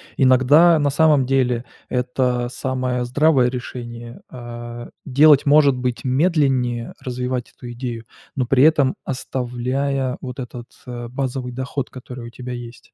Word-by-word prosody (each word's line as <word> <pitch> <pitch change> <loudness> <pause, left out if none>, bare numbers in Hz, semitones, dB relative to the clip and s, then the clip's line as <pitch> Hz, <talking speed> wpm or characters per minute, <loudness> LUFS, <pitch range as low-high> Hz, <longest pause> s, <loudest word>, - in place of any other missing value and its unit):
Иногда, 145 +6 +5
на 145 -1 +2
самом 145 -2 +3
деле, 125 -2 +1 0.2
это 125 -1 0
самое 125 -1 -2
здравое 130 0 +3
решение, 120 -2 -7
э, 120 -1 -8 0.2
делать, 145 +1 +5
может 145 -1 +5
быть, 125 0 -3
медленнее, 130 -5 +1
развивать 125 -1 -3
эту 120 -1 -9
идею, 120 -2 -5 0.3
но 130 - +1
при 130 +2 +3
этом 145 -4 +4
оставляя 130 +1 -2
вот 125 0 -7
этот, 125 -1 -7 0.2
э, 120 -1 -6
базовый 130 0 -3
доход, 130 +1 -4
который 125 -1 -9
у - - -8
тебя 125 +1 -7
есть. 120 0 -10
125 Hz, 135 wpm, -21 LUFS, 120-135 Hz, 0.3 s, Иногда